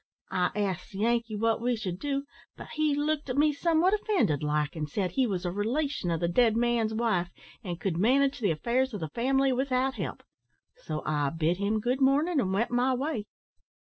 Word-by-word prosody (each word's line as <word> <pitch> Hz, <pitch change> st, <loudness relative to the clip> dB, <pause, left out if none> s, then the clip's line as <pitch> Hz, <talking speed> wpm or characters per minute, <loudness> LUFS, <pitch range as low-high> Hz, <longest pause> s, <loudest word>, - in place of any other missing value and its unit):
I 180 Hz, -1 st, +1 dB
asked 195 Hz, -3 st, -2 dB
the -, -, -7 dB
Yankee 230 Hz, +1 st, 0 dB
what 225 Hz, +2 st, +1 dB
we 245 Hz, 0 st, +1 dB
should 185 Hz, -5 st, -4 dB
do, 275 Hz, +1 st, -2 dB, 0.3 s
but -, -, -10 dB
he 305 Hz, -2 st, +1 dB
looked 295 Hz, 0 st, -1 dB
at 250 Hz, -, -2 dB
me 300 Hz, +1 st, +4 dB
somewhat 335 Hz, +5 st, +2 dB
offended 405 Hz, -, +1 dB
like, 150 Hz, +1 st, -1 dB
an' 155 Hz, -2 st, -3 dB
said 180 Hz, +4 st, -2 dB
he 255 Hz, +6 st, +1 dB
was 185 Hz, -4 st, -3 dB
a 175 Hz, -, -1 dB
relation 230 Hz, -, -1 dB
o' 165 Hz, -, +1 dB
the 170 Hz, -, 0 dB
dead 225 Hz, +5 st, +3 dB
man's 235 Hz, -2 st, +1 dB
wife, 220 Hz, -6 st, 0 dB, 0.3 s
and 175 Hz, -4 st, -5 dB
could 170 Hz, -1 st, -1 dB
manage 270 Hz, +8 st, +3 dB
the 210 Hz, -5 st, +1 dB
affairs 235 Hz, +10 st, 0 dB
o' -, -, -2 dB
the 160 Hz, -5 st, -5 dB
family 265 Hz, -, +1 dB
without 265 Hz, +1 st, 0 dB
help; -, -, -5 dB, 0.5 s
so 155 Hz, -, -5 dB
I 145 Hz, -2 st, 0 dB
bid 165 Hz, +3 st, 0 dB
him 205 Hz, +2 st, 0 dB
good 250 Hz, +5 st, -1 dB
mornin', 290 Hz, +5 st, +3 dB
and 190 Hz, -7 st, 0 dB
went 210 Hz, +6 st, 0 dB
my 250 Hz, +2 st, +2 dB
way. 265 Hz, -5 st, -2 dB
230 Hz, 205 wpm, -28 LUFS, 180-270 Hz, 0.5 s, me